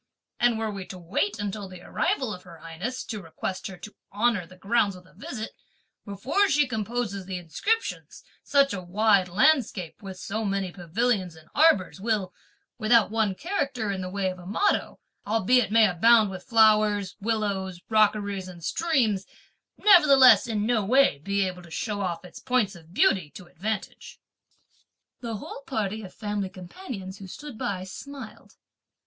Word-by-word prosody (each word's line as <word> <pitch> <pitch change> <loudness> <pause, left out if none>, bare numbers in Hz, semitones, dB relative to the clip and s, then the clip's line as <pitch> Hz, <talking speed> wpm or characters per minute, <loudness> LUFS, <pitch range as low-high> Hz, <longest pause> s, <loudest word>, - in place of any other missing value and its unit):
And 240 -2 +3
were 220 -1 -2
we 195 -2 -7
to 185 - -8
wait 200 +4 -1
until 205 -1 -4
the 185 -1 -11
arrival 250 -6 -1
of 180 - -9
her 170 -2 -13
highness, 165 +11 -5
to 215 -3 -6
request 185 +2 -5
her 190 - -9
to 215 - -10 0.2
honour 210 -4 +1
the 185 - -16
grounds 200 0 +1
with 180 0 -14
a 185 - -21
visit, 220 +3 -6 0.5
before 245 - +1
she 295 +1 +4
composes 220 -4 -3
the 190 -1 -3
inscriptions, 400 - -2 0.2
such 280 -1 +3
a 185 - -4
wide 195 +1 +3
landscape, 210 - +1
with 190 -2 -8
so 215 +4 -4
many 195 -2 -1
pavilions 185 +1 -1
and 160 0 -17
arbours, 240 - +3
will, 210 -4 -1 0.5
without 225 -1 +4
one 220 -3 +1
character 275 - -2
in 190 -1 -3
the 185 - -4
way 190 0 -1
of 185 - -10
a 175 - -11
motto, 395 - 0 0.3
albeit 225 +3 +3
it - - -11
may 225 -1 +6
abound 215 +3 +4
with 185 -1 -8
flowers, 215 -4 +3
willows, 200 -4 -2
rockeries, 205 -3 +1
and 175 -2 -11
streams, 235 - +1 0.5
nevertheless 280 -12 +7
in 215 -2 -1
no 230 -2 +2
way 250 - +4
be 200 +5 0
able 180 -1 -5
to 170 - -14
show 205 +4 -3
off 180 -2 -3
its 180 - -11
points 250 -6 +1
of 165 -1 -15
beauty 180 -3 +2
to 175 +6 -12
advantage." 205 +4 -5 1.0
The 230 -3 -4
whole 210 - -8
party 220 -3 -2
of 190 -3 -9
family 205 -2 -3
companions, 190 - -8
who 195 - -9
stood 290 +7 -9
by, 195 -3 -3
smiled. 275 +8 -10
205 Hz, 165 wpm, -26 LUFS, 185-230 Hz, 1.0 s, nevertheless